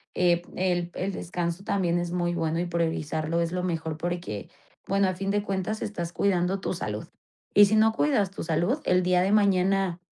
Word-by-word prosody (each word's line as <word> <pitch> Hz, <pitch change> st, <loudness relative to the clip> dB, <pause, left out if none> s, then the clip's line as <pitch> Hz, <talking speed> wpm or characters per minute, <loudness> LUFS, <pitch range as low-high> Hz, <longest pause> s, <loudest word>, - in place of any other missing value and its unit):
eh, 175 Hz, -1 st, +3 dB
el 175 Hz, -1 st, 0 dB
el 195 Hz, +2 st, -2 dB
descanso 175 Hz, +1 st, -3 dB
también 175 Hz, -4 st, +1 dB
es 175 Hz, 0 st, -3 dB
muy 175 Hz, -1 st, 0 dB
bueno 165 Hz, 0 st, -1 dB
y 175 Hz, -, 0 dB
priorizarlo 165 Hz, -1 st, -1 dB
es 165 Hz, 0 st, -1 dB
lo 180 Hz, 0 st, -1 dB
mejor 160 Hz, -3 st, -2 dB
porque, 175 Hz, -, -4 dB, 0.4 s
bueno, 195 Hz, 0 st, +2 dB
a -, -, -1 dB
fin 195 Hz, +2 st, -3 dB
de 205 Hz, 0 st, 0 dB
cuentas 195 Hz, +2 st, -2 dB
estás 175 Hz, -5 st, -4 dB
cuidando 190 Hz, 0 st, +1 dB
tu -, -, -2 dB
salud -, -, -4 dB, 0.5 s
y 205 Hz, -, +8 dB
si 210 Hz, +2 st, +1 dB
no 220 Hz, +1 st, +4 dB
cuidas 225 Hz, -7 st, +2 dB
tu -, -, -6 dB
salud, 175 Hz, -, 0 dB
el 180 Hz, 0 st, +3 dB
día 180 Hz, 0 st, +3 dB
de 195 Hz, +2 st, +1 dB
mañana 195 Hz, -3 st, +2 dB
180 Hz, 195 wpm, -26 LUFS, 170-195 Hz, 0.5 s, y